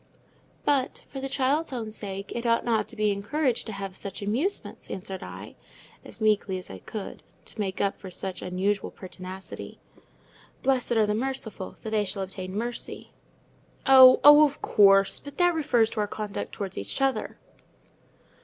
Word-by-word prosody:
"But, 275 -3 +1
for 270 - -6
the 270 - -3
child's 280 +4 +1
own 230 -4 -4
sake, 200 -2 -6
it 235 - -3
ought 230 -1 +2
not 230 -2 +1
to - - -8
be 210 -1 +2
encouraged 245 +5 -1
to - - -4
have 195 -1 -6
such 200 +1 -4
amusements," 260 - -2
answered 190 0 -4
I, - - -9 0.5
as - - -11
meekly 210 -3 +1
as 180 - -9
I 95 - -8
could, 210 - -7 0.2
to - - -8
make 195 -2 -2
up 200 -1 0
for 190 - -8
such 185 +1 -5
unusual 190 +3 -1
pertinacity. 185 0 -9 0.9
"'Blessed 260 -2 +1
are 220 -2 +4
the 210 - 0
merciful, 225 -4 -4
for 220 - -5
they 215 -1 +2
shall 195 0 -3
obtain 185 0 -6
mercy.'" 235 +2 -5 0.7
"Oh! 260 -2 +9
of 295 0 +8
course; 195 -1 +5
but 285 - -11
that 355 -1 +4
refers 240 -8 +2
to 220 - -4
our 210 - +1
conduct 210 -1 -5
towards 195 - -4
each 100 0 -4
other." 270 -1 0
215 Hz, 165 wpm, -27 LUFS, 195-255 Hz, 0.9 s, Oh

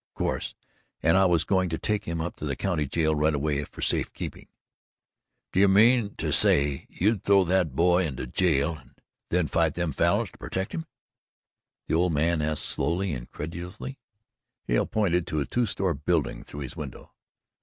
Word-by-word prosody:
"Of - - -65
course - - -2 0.5
and 80 +2 +4
I 95 0 +5
was 85 -3 +4
going 95 -1 +1
to 80 - -2
take 105 +3 -1
him 85 -1 -3
up 85 - -4
to - - -5
the 70 -2 -2
county 85 -5 -1
jail 80 +2 +1
right 75 0 +2
away 75 0 -1
for - - -8
safe - - +1
keeping." - - -7 1.1
"D'ye 100 +2 +5
mean 110 +2 +4
to - - -2
say 70 -1 +2
you'd 105 +1 0
throw 100 -1 +5
that 90 -6 +1
boy 90 +2 +3
into 65 -3 -5
jail 80 +2 +1
and 65 0 -20 0.3
then 90 -1 +2
fight 80 -1 +1
them 85 -2 -1
Falins - - +1
to - - -19
pertect 95 +1 -3
him?" 165 - -4 1.0
the - - -3
old 85 +1 +2
man 80 +2 +1
asked 75 0 +1
slowly 85 +6 0
and 65 - -3
incredulously. 90 - -7 0.6
Hale - - +1
pointed 90 -5 +1
to 75 - -1
a 70 - -1
two 120 -1 0
store 95 -2 0
building 75 0 -1
through 75 - -8
his 65 - -6
window. - - -8
85 Hz, 185 wpm, -26 LUFS, 75-95 Hz, 1.1 s, I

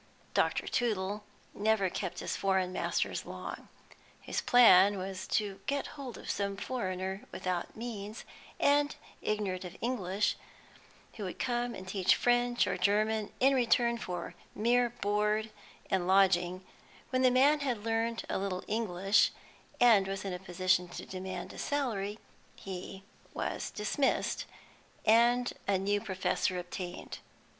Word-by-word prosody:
Dr. - - +1
Tootle 210 -3 -1 0.3
never 210 -1 +2
kept - - -4
his - - -2
foreign 190 -2 +1
masters - - -1
long. - - -7 0.5
His - - -3
plan 205 -5 +7
was 190 0 -5
to 200 -2 -1
get 280 0 0
hold 275 -5 -7
of - - -11
some 200 -1 -2
foreigner 190 -4 -3
without 180 -2 -3
means, 220 -2 -6 0.3
and 290 0 +3 0.3
ignorant 200 -4 -1
of 180 0 -8
English, 205 -5 0 0.8
who 210 - -6
would 185 - -5
come 240 -1 -1
and 185 - -9
teach 190 -1 +3
French 245 0 +2
or - - -2
German 215 +1 +1
in 270 +2 +5
return 235 -2 +3
for 175 -5 -5 0.2
mere 240 +2 +3
board 210 -1 0 0.4
and 185 -2 0
lodging; 185 -1 +3 0.5
when 255 0 +2
the 255 - +6
man 275 +4 +5
had 245 -7 -2
learnt 230 0 0
a - - -1
little 190 -2 -3
English, 200 -2 +2 0.5
and 220 -6 +6
was 195 0 -4
in 190 - -2
a 180 - -4
position 185 0 +1
to - - -8
demand 185 0 -6
a - - -9
salary, 215 -8 -1 0.4
he 190 0 -7 0.3
was - - -3
dismissed, 215 +6 0 0.6
and 240 +2 +4
a 200 -1 +3
new 205 +2 0
professor 185 -1 -1
obtained. 180 0 -6
205 Hz, 135 wpm, -31 LUFS, 190-235 Hz, 0.8 s, plan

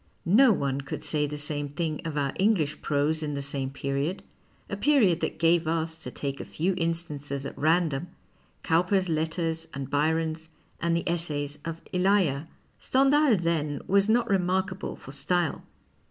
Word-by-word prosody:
No 225 +8 +6
one 140 -7 0
could 140 - -6
say 150 -1 +1
the 150 +1 -5
same 145 -1 -2
thing 155 +1 -3
of 155 -2 -3
our 140 -2 0
English 180 -8 +2
prose 150 +2 +1
in 150 -2 -3
the 140 - -2
same 140 -1 -2
period 140 +6 -2 0.2
— - - -36
a - - -3
period 205 - +3
that - - -2
gave 165 0 +3
us, 160 0 0
to 125 - -7
take 140 +1 -4
a - - -4
few 180 +5 -1
instances 150 -5 -3
at - - -6
random, 160 0 +1 0.6
Cowper's 180 +3 +2
letters 160 +1 -1
and 135 -1 -5
Byron's, 160 +2 0 0.3
and 170 0 +1
the 170 - -4
Essays 150 -4 -2
of 165 0 -5
Elia. 180 -6 +2 0.3
Stendhal, 275 0 +4
then, 155 -4 -1
was 200 +2 +3
not 235 +2 +3
remarkable 190 0 0
for 135 - -11
style. 175 +3 0
160 Hz, 165 wpm, -27 LUFS, 145-180 Hz, 0.6 s, No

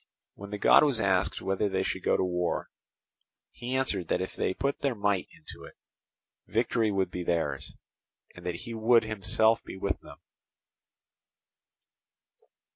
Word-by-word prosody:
When 100 0 -10
the 105 - -4
god - - +6
was 140 -6 +2
asked 95 -2 +1
whether 95 +2 0
they 95 -1 0
should 95 - -2
go - - +2
to - - +1
war, 90 -1 -1 0.8
he 125 +2 -5
answered 100 -10 0
that - - +1
if 95 - -4
they 95 - -1
put 140 0 -1
their 140 -3 0
might 100 -3 0
into - - -12
it, - - -12 0.7
victory 115 0 +1
would 95 -3 0
be 90 - -4
theirs, 80 -5 -1 0.6
and 90 - -13
that 90 -1 -2
he 120 - -6
would 115 +1 +4
himself 110 +1 +1
be - - -8
with 95 0 -1
them. - - -13
100 Hz, 155 wpm, -29 LUFS, 95-115 Hz, 0.8 s, god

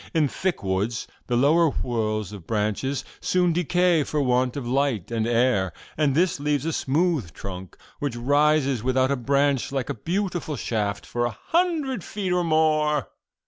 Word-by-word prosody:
In 155 -3 +4
thick 180 - -2
woods 100 +5 -1 0.2
the 120 - 0
lower 160 +6 +4
whorls 110 -6 -2
of 95 -6 -10
branches 110 +5 -1
soon 180 -2 +2
decay 175 -1 +2
for 150 - -2
want 125 -1 +1
of 130 -4 -4
light 130 -6 0
and 115 -1 0
air, 120 -6 +2 0.2
and 145 -3 +1
this 175 -1 +2
leaves 145 -1 0
a 165 - -1
smooth 145 - 0
trunk, 95 +1 -8 0.2
which 140 -4 -2
rises 140 0 +2
without 130 +2 +2
a - - +2
branch, 140 +1 +1
like 135 -3 -2
a - - -2
beautiful 175 - -2
shaft, 105 -6 -2
for 120 0 -1
a 115 -4 -4
hundred 315 - +1
feet 195 -3 -3
or 180 0 +2
more. 155 - +2
140 Hz, 165 wpm, -24 LUFS, 120-160 Hz, 0.2 s, In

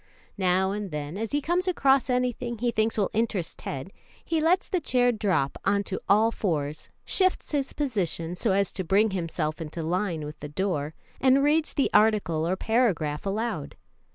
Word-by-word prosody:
Now 190 +1 +2
and 205 -1 -4
then, 150 0 -5
as 220 +2 -3
he 290 - +1
comes 355 +4 0
across 275 -7 +3
anything 250 -1 -1
he 240 +2 0
thinks 220 0 0
will 205 - +1
interest 210 -6 -1
Ted, 140 +8 -6 0.3
he 325 -2 0
lets 350 +4 +2
the 370 - 0
chair 250 -5 +2
drop 195 - 0
on 200 +1 +2
to 190 - -5
all 215 +3 +5
fours, 155 -8 -2 0.2
shifts 375 -1 +1
his 280 -3 -1
position 185 - -2
so 200 +4 0
as 195 0 +2
to 190 - -3
bring 200 +5 +3
himself 165 -3 -2
into 160 +1 -5
line 170 -2 -1
with 150 0 -8
the 150 - -7
door, 155 -3 -2 0.2
and 265 +1 +4
reads 305 +2 +2
the 275 - +1
article 200 -7 +3
or 185 - +1
paragraph 195 -9 0
aloud. 205 -6 -3
200 Hz, 180 wpm, -26 LUFS, 165-245 Hz, 0.3 s, all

